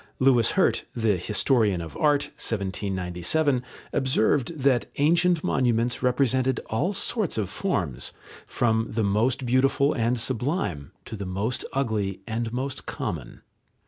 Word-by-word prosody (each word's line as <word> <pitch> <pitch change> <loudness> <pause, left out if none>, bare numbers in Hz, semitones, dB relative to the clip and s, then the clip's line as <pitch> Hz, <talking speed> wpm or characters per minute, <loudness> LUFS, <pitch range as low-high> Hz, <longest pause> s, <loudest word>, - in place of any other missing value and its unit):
Louis 130 -3 +4
Hirt, - - +2
the 110 -3 +2
historian 105 +1 +1
of 80 -2 -7
art 145 -2 +2
(1797) 100 - -1 0.3
observed 130 +3 +1
that 130 -2 +3
ancient 170 +3 +3
monuments 120 -2 +1
represented 130 0 +2
all 115 - +1
sorts 205 - -1
of 100 -3 -2
forms, 95 - -2 0.4
from 115 -1 +1
the 110 0 -1
most 115 +6 +1
beautiful 135 +3 +3
and 120 0 0
sublime 115 - -2
to - - -7
the 100 -2 -5
most 100 +7 -2
ugly 110 -8 -1
and 115 0 -3
most 130 +2 -4
common. 80 - -5
120 Hz, 125 wpm, -25 LUFS, 105-135 Hz, 0.4 s, Louis